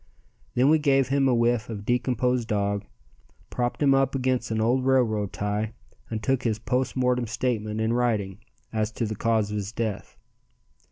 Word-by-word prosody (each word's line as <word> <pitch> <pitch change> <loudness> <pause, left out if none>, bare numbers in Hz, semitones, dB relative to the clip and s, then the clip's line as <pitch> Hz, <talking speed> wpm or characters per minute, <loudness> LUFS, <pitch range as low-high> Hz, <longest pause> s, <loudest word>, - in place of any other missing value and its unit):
Then 130 +4 +4
we 160 - +5
gave 135 -3 +2
him 135 0 +3
a 125 - +3
whiff 120 0 +1
of 105 -2 -6
decomposed 125 0 +1
dog, 100 -1 -1 0.7
propped 120 +4 -1
him 140 -1 +5
up 135 0 +2
against 130 -2 0
an 110 -1 -1
old 120 +4 +2
railroad 115 -6 +2
tie 105 +2 -2 0.4
and 110 -2 -4
took 130 +1 +1
his 110 -4 0
post 125 +3 -1
mortem 125 -2 +1
statement 110 -2 -2
in 110 +1 +1
writing 110 -5 0 0.3
as 110 -1 0
to 115 - -2
cause 110 -1 0
of 105 - -2
his 100 0 -4
death. 110 -3 -4
115 Hz, 170 wpm, -26 LUFS, 110-130 Hz, 0.7 s, we